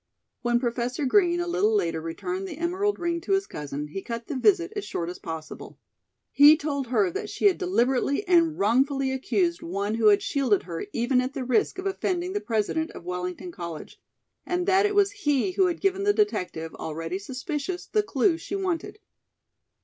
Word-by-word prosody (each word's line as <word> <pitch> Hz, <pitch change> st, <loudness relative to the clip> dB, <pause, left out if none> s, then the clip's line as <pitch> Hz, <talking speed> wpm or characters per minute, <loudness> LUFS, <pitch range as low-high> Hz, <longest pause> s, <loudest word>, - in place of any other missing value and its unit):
When 240 Hz, -1 st, +2 dB
Professor 245 Hz, +3 st, -2 dB
Green 350 Hz, +4 st, +3 dB
a 350 Hz, -, -1 dB
little 380 Hz, +5 st, +1 dB
later 165 Hz, -, 0 dB
returned 180 Hz, +3 st, -4 dB
the -, -, -7 dB
emerald 370 Hz, +5 st, 0 dB
ring 340 Hz, -1 st, -2 dB
to 390 Hz, -, -1 dB
his 390 Hz, 0 st, +2 dB
cousin, 150 Hz, -, -6 dB
he 195 Hz, +6 st, -5 dB
cut 230 Hz, +2 st, -5 dB
the 290 Hz, -, -5 dB
visit 360 Hz, +6 st, +2 dB
as 410 Hz, -, -3 dB
short 170 Hz, 0 st, -4 dB
as 180 Hz, -, -10 dB
possible. 160 Hz, -1 st, -8 dB, 0.5 s
He 295 Hz, +2 st, +8 dB
told 280 Hz, -4 st, -3 dB
her 210 Hz, -7 st, +2 dB
that -, -, -4 dB
she -, -, -3 dB
had 390 Hz, -3 st, +5 dB
deliberately 280 Hz, -, +1 dB
and 335 Hz, -3 st, +4 dB
wrongfully 265 Hz, +5 st, +2 dB
accused 340 Hz, +6 st, 0 dB
one 200 Hz, +4 st, -2 dB
who 225 Hz, -1 st, +3 dB
had 205 Hz, -1 st, +5 dB
shielded 255 Hz, -8 st, +1 dB
her 170 Hz, +2 st, -6 dB
even 245 Hz, +3 st, +1 dB
at 255 Hz, +2 st, -4 dB
the 265 Hz, -, -2 dB
risk 255 Hz, +8 st, +1 dB
of 380 Hz, -, -5 dB
offending 370 Hz, -2 st, -1 dB
the 410 Hz, -, -1 dB
President 235 Hz, +9 st, -1 dB
of -, -, -10 dB
Wellington 180 Hz, 0 st, -4 dB
College, 170 Hz, -2 st, -8 dB, 0.4 s
and 355 Hz, 0 st, -1 dB
that 385 Hz, +2 st, +4 dB
it 410 Hz, -, -3 dB
was 405 Hz, -1 st, +4 dB
he 300 Hz, -5 st, 0 dB
who 375 Hz, 0 st, +3 dB
had 345 Hz, -2 st, -2 dB
given 390 Hz, 0 st, +1 dB
the 410 Hz, 0 st, +3 dB
detective, 180 Hz, -, -1 dB
already 165 Hz, +3 st, -4 dB
suspicious, 295 Hz, -, -4 dB
the 425 Hz, -, +1 dB
clue 330 Hz, -2 st, +1 dB
she 395 Hz, -, -5 dB
wanted. 375 Hz, -3 st, -2 dB
275 Hz, 190 wpm, -26 LUFS, -, 0.5 s, He